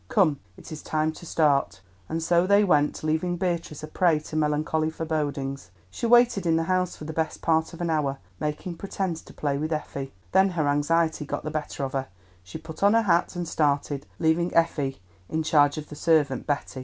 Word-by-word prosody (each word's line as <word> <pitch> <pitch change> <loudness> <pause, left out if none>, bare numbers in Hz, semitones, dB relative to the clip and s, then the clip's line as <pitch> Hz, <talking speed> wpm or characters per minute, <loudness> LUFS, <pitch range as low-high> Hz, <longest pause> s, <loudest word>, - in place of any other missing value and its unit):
Come, 170 - +3 0.2
it - - -12
is 155 - -6
time 155 0 0
to 170 +2 -12
start." 140 -11 +2 0.3
And 165 0 -2
so 175 +2 +3
they 200 +1 +5
went, 150 -7 +2
leaving 160 +3 0
Beatrice 170 -4 -3
a - - -4
prey 165 0 +2
to 155 - -9
melancholy 155 +1 +1
forebodings. 145 - -3 0.2
She 235 - -2
waited 240 -6 +4
in 165 - +3
the 165 - +1
house 180 +1 0
for 155 - -9
the 160 - -5
best 160 0 -2
part 160 0 +2
of 170 - -9
an 170 -1 0
hour, 140 -3 0 0.2
making 155 +3 -4
pretence 190 -3 -3
to - - -15
play 140 -2 -1
with 155 +2 -2
Effie. 140 -3 -4 0.2
Then 190 +1 +5
her 155 -2 +2
anxiety 160 +2 +1
got 145 - -4
the 155 - -4
better 150 -2 -4
of 135 - -3
her; 135 -1 -2 0.3
she 90 +10 -9
put 160 0 -10
on 200 +2 +5
her 230 - +4
hat 175 -2 +2
and 175 -1 -3
started, 145 -2 0
leaving 165 +2 +1
Effie 145 -7 +1 0.3
in 160 0 -1
charge 145 -1 +3
of 155 - -6
the 150 - -8
servant 150 -5 +1
Betty. 145 -2 -2
155 Hz, 205 wpm, -26 LUFS, 145-170 Hz, 0.3 s, they